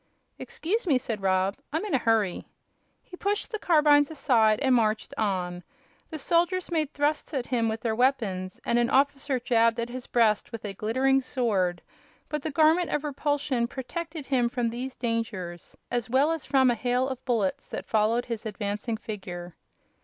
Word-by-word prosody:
"Excuse 455 -2 -2
me," 280 -6 +4
said 230 -5 -4
Rob; 190 +1 +1
"I'm 315 +7 -1
in 415 - -4
a 265 - +4
hurry." 220 -6 +1 0.6
He 360 - -11
pushed 405 +5 -2
the 435 - -3
carbines 295 -5 +4
aside 230 -8 +3
and 265 -2 +3
marched 220 -3 +1
on. 180 -4 -1 0.5
The 315 - -5
soldiers 350 +5 +1
made 310 -3 0
thrusts 295 +1 -1
at 255 -3 -1
him 230 -3 0
with 220 0 -3
their 225 -2 0
weapons, 220 -7 0
and 235 - +2
an 240 0 +2
officer 275 0 +2
jabbed 230 -1 +2
at 235 +1 -2
his 250 0 -7
breast 220 -3 +2
with 225 -2 -7
a 200 - -4
glittering 260 +7 +2
sword, 205 -9 0 0.5
but 300 -1 -2
the 315 - -3
Garment 315 +4 +3
of 295 - -1
Repulsion 285 -4 -1
protected 315 +4 -6
him 250 -4 +1
from 235 -1 -1
these 255 +3 -5
dangers 215 -8 -4 0.2
as 240 0 -1
well 270 +6 +3
as 325 -3 -4
from 265 -2 +4
a - - +2
hail 250 +2 0
of 260 -1 -5
bullets 220 -7 -1
that - - -5
followed 225 +2 +1
his 230 -3 -4
advancing 210 +2 -3
figure. 180 -5 -7
245 Hz, 175 wpm, -27 LUFS, 220-290 Hz, 0.6 s, me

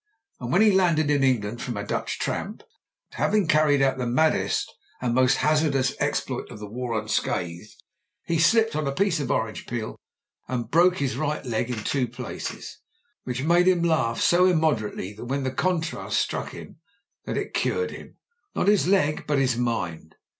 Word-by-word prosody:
And - - -5
when - - +5
he 215 - +6
landed 170 -6 +3
in 145 -2 +2
England 120 -3 0
from 120 -4 -4
a 100 - -4
Dutch - - -3
tramp, - - -4 0.5
having 205 -4 +1
car 155 0 +4
ried 145 -2 +3
out 135 -1 +1
the 125 - -1
maddest 155 +7 +1 0.3
and 125 -2 -1
most 130 0 +3
hazardous 150 -4 +2
exploit - - -2
of - - -9
the 105 - -7
war 115 +1 -3
unscathed, 90 -3 -3 0.5
he 165 -1 0
slipped 225 +7 +3
up 155 - 0
on 150 - -3
a 140 - -1
piece 190 -3 +1
of 145 - -3
orange 110 -1 -2
peel 115 -2 -4 0.5
and 120 -2 -3
brc4ce 175 +3 +4
his 135 -2 -1
right 150 -1 -2
leg 120 0 -1
in 115 -4 -4
two 130 0 0
places, 120 +1 -7 0.5
which 125 +1 -3
made 175 +3 +4
him 180 -2 +3
laugh 160 -9 +1
so 180 +1 +4
immoderately 145 - 0
when 130 +6 -4
the 130 - -1
contrast 165 +3 -1
struck - - -1
him - - -11 0.5
that - - -3
it - - -4
cured 460 0 0
him' - - -11 0.2
— 410 -3 -47
^not - - 0
his 205 -3 +4
leg, 165 -6 +2
but 145 -1 +1
his 130 -3 +2
mind. 90 -10 -3
135 Hz, 185 wpm, -25 LUFS, 120-165 Hz, 0.5 s, he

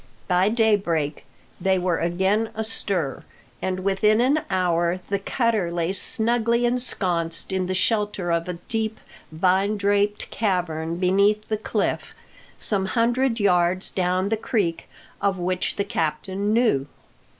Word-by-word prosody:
By 180 +2 +3
daybreak 200 -10 +1 0.3
they 190 +1 +2
were 180 -2 0
again 190 +6 +1
astir, 200 -9 -2 0.4
and 185 0 -2
within 200 +3 +2
an 270 +5 +3
hour 175 -1 +1
the 200 0 0
cutter 220 -4 0
lay 170 +1 -1
snugly 235 +4 +2
ensconced 185 -10 0
in 190 -1 -1
the 185 - -2
shelter 205 -3 0
of 170 +1 -1
a - - -2
deep, 220 -1 -2 0.3
vine 190 +5 +1
draped 205 +1 0
cavern 170 -6 -1
beneath 200 +4 +2
the 215 - 0
cliff, 215 - -2 0.4
some 195 -3 0
hundred 240 +2 +1
yards 180 -2 +2
down 185 +1 0
the 220 - 0
creek, 200 -7 -2 0.3
of 200 -1 +1
which 180 +1 -2
the 200 - -1
captain 190 +4 -2
knew. 220 - +2
195 Hz, 130 wpm, -23 LUFS, 180-215 Hz, 0.4 s, By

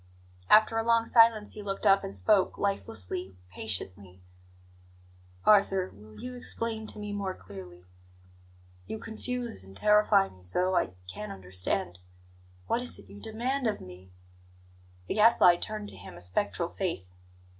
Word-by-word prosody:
After 220 +1 +6
a - - 0
long 230 0 +3
silence 230 -3 +5
he 210 - -8
looked 195 -1 -4
up 195 0 +5
and 95 - -3
spoke, 185 - +3
lifelessly, 95 - -3 0.2
patiently: 95 -2 -5 1.2
"Arthur, 195 -3 +4
will 105 +1 -14
you 250 0 -6
explain 230 -3 -3
to - - -6
me 210 -1 -5
more 195 -2 -3
clearly? 90 -3 -11 1.0
You - - -4
confuse 235 - -5
and 95 +1 -10
terrify 210 -2 +4
me 95 - -17
so, 180 - +2
I 90 - 0
can't 100 +3 -6
understand. 90 -2 -3 0.7
What 235 - 0
is 250 - 0
it 100 -1 -15
you 100 0 -11
demand 250 +4 -2
of 210 - -1
me?" 90 +1 -12 1.0
The - - -2
Gadfly 210 -5 +6
turned 210 +2 -4
to - - -7
him - - -11
a - - -11
spectral 100 - -1
face. 95 - -3
190 Hz, 145 wpm, -29 LUFS, -, 1.2 s, After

